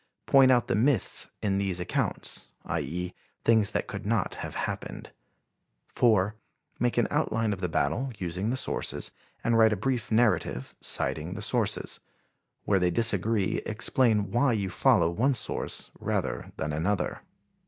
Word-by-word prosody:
Point 135 -1 +6
out 120 -3 +4
the - - -1
myths 115 +1 +1
in 100 -2 +1
these 95 -3 -1
accounts, 90 - -3 0.2
i. - - -1
e., 90 +5 -4 0.3
things 110 -3 +4
that - - -1
could 100 0 -6
not 110 -2 0
have - - -6
happened. - - -4 0.8
4. 105 -4 +3 0.5
Make 120 0 0
an 120 - +3
outline 110 -1 +1
of 95 - -7
the 90 - -1
battle, 85 - 0
using 90 +3 -2
the 130 - 0
sources, - - -1 0.3
and 115 -1 +3
write 110 -1 +6
a - - 0
brief 120 +2 -2
narrative, 110 - +1
citing - - -2
the - - -5
sources. - - -1 0.7
Where 100 -2 +3
they 90 -1 +2
disagree, 105 0 +2
explain 110 -2 +1
why 120 +2 +3
you 100 -4 -1
follow 80 - +4
one 125 +10 +2
source 105 - -4
rather - - -2
than 75 - -2
another." 95 +7 -1
105 Hz, 155 wpm, -28 LUFS, 95-115 Hz, 0.8 s, Point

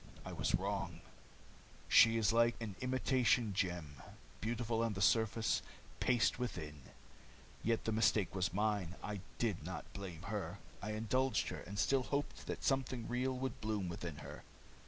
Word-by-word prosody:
I - - -5
was - - +1
wrong. - - -2 0.9
She 115 0 +7
is 110 -1 +3
like 115 0 +4
an 110 -4 -5
imitation 130 -3 +2
gem 85 -7 -2 0.4
beautiful 115 +1 -1
on 115 -2 +1
the 95 - -4
surface, 110 +1 +3 0.4
paste 125 -1 +3
within. 80 - -4 0.8
Yet 115 0 +1
the 110 - +1
mistake 110 -3 +3
was 90 -2 0
mine, 100 -2 0
and 105 -1 -3
I - - -10 0.2
did 105 -9 0
not 95 +3 -5
blame 90 -4 -7
her. 100 +1 -3 0.2
I 105 +1 -3
indulged 130 +5 +1
her, - - -5
and 100 - -7
still 135 +5 +3
hoped 140 +3 -3
that - - -4
something 130 -4 0
real 130 +1 0
would 130 -1 -3
bloom 105 -4 -1
within 85 -2 -5
her." - - -8
110 Hz, 155 wpm, -37 LUFS, 95-120 Hz, 0.9 s, She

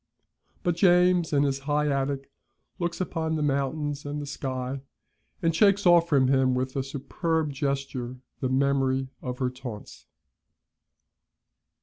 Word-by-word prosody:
But 175 -1 +1
James, 180 -1 +4
in 145 -1 +3
his 135 -1 0
high 150 0 +2
attic, 140 0 -1 0.5
looks 175 -1 -2
upon 160 -3 -1
the 155 - -1
mountains 145 +1 -1
and 145 +1 -4
the 145 - -5
sky, 130 -1 -4 0.6
and 165 -1 +2
shakes 200 +2 +4
off 170 -1 +6
from 135 -4 +4
him 130 -1 +3
with 130 +1 -2
a 135 - +1
superb 150 +3 -2
gesture 135 -3 -3 0.2
the 130 - -1
memory 135 0 +1
of 125 -1 -4
her 125 -1 -1
taunts. 125 -5 -9
140 Hz, 135 wpm, -27 LUFS, 130-160 Hz, 0.6 s, off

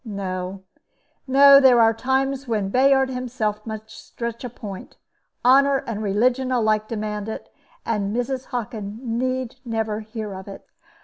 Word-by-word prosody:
No, 190 -3 -5 0.6
no; 275 +1 +8
there 260 -3 +6
are 225 0 +5
times 265 +3 -1
when 210 -4 -1
Bayard 265 +3 +3
himself 235 -4 -3
must 220 0 -7
stretch 235 0 -7
a 250 - -4
point. 205 -5 -9 0.5
Honor 275 +2 +5
and 220 -2 -4
religion 245 +6 +1
alike 215 -3 +1
demand 210 -1 -4
it; 220 - -8 0.3
and 205 -3 -1
Mrs. 250 +3 -2
Hockin 220 -4 -5
need 255 +1 -2
never 220 -3 -2
hear 215 -1 -6
of 190 +1 -9
it." 195 - -10
230 Hz, 140 wpm, -23 LUFS, 210-255 Hz, 0.6 s, no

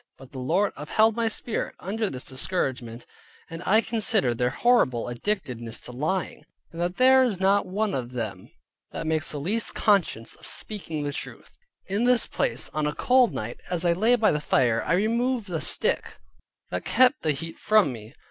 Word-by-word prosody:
But 135 -1 -15
the 135 - -8
Lord 180 +11 +1
upheld 215 +9 +2
my 230 -1 0
Spirit, 225 +1 -3
under 215 +3 -2
this 130 -1 -7
discouragement; 130 -5 -3 0.5
and 165 +1 -7
I 215 +3 +5
considered 205 - +1
their 125 0 +2
horrible 135 - +2
addictedness 120 - -3
to - - -7
lying, 155 +9 -3 0.3
and 170 - -6
that 175 +1 -2
there 260 +1 +6
is 220 -8 -1
not 195 +1 +2
one 205 +2 -1
of 125 -1 -4
them 110 -6 -5 0.4
that - - -5
makes 155 -1 0
the 145 - -5
least 205 +10 -1
conscience 180 - +1
of - - -10
speaking 165 -8 -1
of 145 - -3
truth. - - -7 0.3
In 205 +5 -1
this 250 -1 +4
place, - - -1
on 155 -1 0
a 150 - -3
cold 255 -2 +3
night, 110 +3 -6
as 180 -1 -1
I 170 - +4
lay 220 +8 +3
by 225 -3 +3
the 150 - -1
fire, 120 -5 +2
I - - +1
removed 230 +2 0
a 160 -2 -2
stick - - +1 0.5
that 90 0 -3
kept 255 +4 +3
the 160 - -1
heat 165 +4 -8
from 215 -11 +3
me. 110 +3 -11
175 Hz, 185 wpm, -25 LUFS, 130-220 Hz, 0.5 s, there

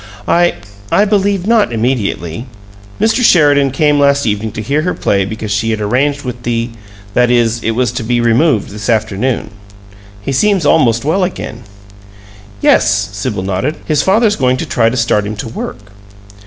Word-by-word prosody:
"I 175 0 +3 0.4
I 205 - +4
believe 200 -2 0
not 220 - +2
immediately. 115 -4 -2 0.5
Mr. 225 +3 +2
Sheridan 145 -8 +4
came 145 +2 +1
last 140 0 +3
evening 105 0 -1
to 110 - -5
hear 140 +7 0
her 180 +3 -2
play 100 -1 0
because 110 +1 -5
she 110 +2 0
had 110 -1 -1
arranged 140 +7 0
with 125 -2 -6
the 120 0 -2 0.4
that 125 +2 +3
is, 120 -1 +1
it 115 - -1
was 125 0 0
to 125 -1 -4
be 120 +2 0
removed 120 +1 +2
this 105 +2 -6
afternoon. 110 +1 -1 0.7
He 100 - -4
seems 190 +4 +1
almost 120 -6 +3
well 175 +6 +1
again." 120 - -5 1.0
"Yes." 105 -1 +3
Sibyl 105 -1 -3
nodded. 100 +11 -2
"His 150 -1 +1
father's 210 +4 +2
going 130 -2 +1
to - - -3
try 115 -2 +1
to 125 - -3
start 115 -3 +1
him 105 - -4
to 105 - -6
work." 105 -3 -7
125 Hz, 170 wpm, -14 LUFS, 110-150 Hz, 1.0 s, I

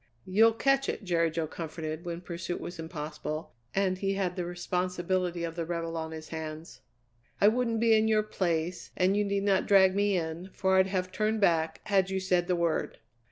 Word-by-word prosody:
"You'll 220 +4 +5
catch 275 +3 +2
it," - - -3
Jerry 170 -3 +2
Jo 160 0 -2
comforted 160 +1 -6
when 170 0 -4
pursuit 175 0 -5
was 175 -1 -7
impossible, 155 -2 -5 0.2
and 190 -1 +1
he 195 0 0
had 185 -2 -1
the 180 - -2
responsibility 180 0 -1
of 165 -1 -4
the 170 - -2
rebel 165 0 -3
on 160 -1 -3
his 160 0 -8
hands. 160 0 -7 0.6
"I 200 - +6
wouldn't 230 0 +2
be 225 -1 +5
in 220 0 +3
your 215 -1 +3
place, 175 -4 -2
and 185 +2 +3
you 210 - +2
need 200 -1 -1
not 195 -2 +2
drag 190 -2 +6
me 200 -1 +2
in, 165 +2 -4
for 190 0 +2
I'd 190 0 +5
have 185 -1 -2
turned 215 +2 0
back 165 -5 +2
had 195 -3 +2
you 190 0 -1
said 180 -2 +1
the 180 - +2
word." 170 -2 -1
180 Hz, 200 wpm, -29 LUFS, 165-195 Hz, 0.6 s, I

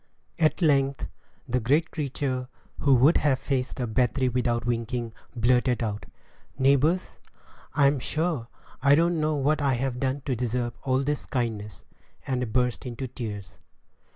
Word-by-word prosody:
At 160 +2 +2
length 140 -3 +2 0.4
the 125 +1 +1
great 145 +8 +1
creature, 135 -4 -2 0.3
who 140 -2 +4
would 135 +7 +5
have 140 -3 +2
faced 130 -1 -2
a 125 - 0
battery 125 +3 +1
without 120 -1 0
winking, 120 -1 -2 0.2
blurted 125 +1 +2
out, 105 -2 -4 0.5
"Neighbors, 140 +6 +2 0.6
I 145 -2 +4
'm 140 0 +3
sure, 155 -3 -1 0.3
I 140 +1 +6
don't 170 +1 +2
know 155 0 +1
what 145 +1 +1
I've 130 -2 0
done 135 +1 -1
to 130 -1 -2
deserve 120 0 -2
all 130 0 +1
this 145 +1 -2
kindness," 110 -6 -3 0.4
and 125 -4 -2
burst 125 +1 0
into 125 +2 -5
tears. 105 -7 -7
130 Hz, 145 wpm, -26 LUFS, 120-140 Hz, 0.6 s, I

